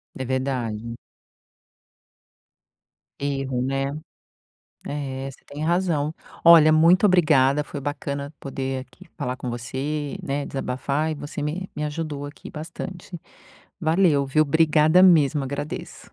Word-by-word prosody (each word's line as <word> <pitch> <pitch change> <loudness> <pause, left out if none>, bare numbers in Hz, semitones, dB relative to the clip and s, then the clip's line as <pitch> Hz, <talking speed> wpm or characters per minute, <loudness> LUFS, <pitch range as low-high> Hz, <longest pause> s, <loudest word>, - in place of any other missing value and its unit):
É 130 - -4
verdade. 120 -3 -2 2.2
Erro 135 -3 -2
né. 135 +1 -1 1.0
É 135 -2 -4
você - - -16
tem 145 +2 -7
razão. 165 -3 +1 0.3
Olha 165 -2 +8
muito 170 +5 +5
obrigada, 150 -6 +4
foi 145 - -7
bacana 140 0 -4
poder 135 -1 -4
aqui - - -16
falar 125 +1 -3
com 125 - -5
você, 135 +5 -4
né, 140 +1 -2
desabafar 140 +4 -2
e - - -3
você 145 +1 -6
me 170 +6 -3
me 150 0 -2
ajudou 150 -2 -4
aqui 145 - -10
bastante. 175 +3 -7 0.6
Valeu 160 -4 +3
viu? 155 +3 +3
Obrigada 155 +3 +4
mesmo 155 -5 +5
agradeço. 140 +2 -5
145 Hz, 120 wpm, -24 LUFS, 135-155 Hz, 2.2 s, Olha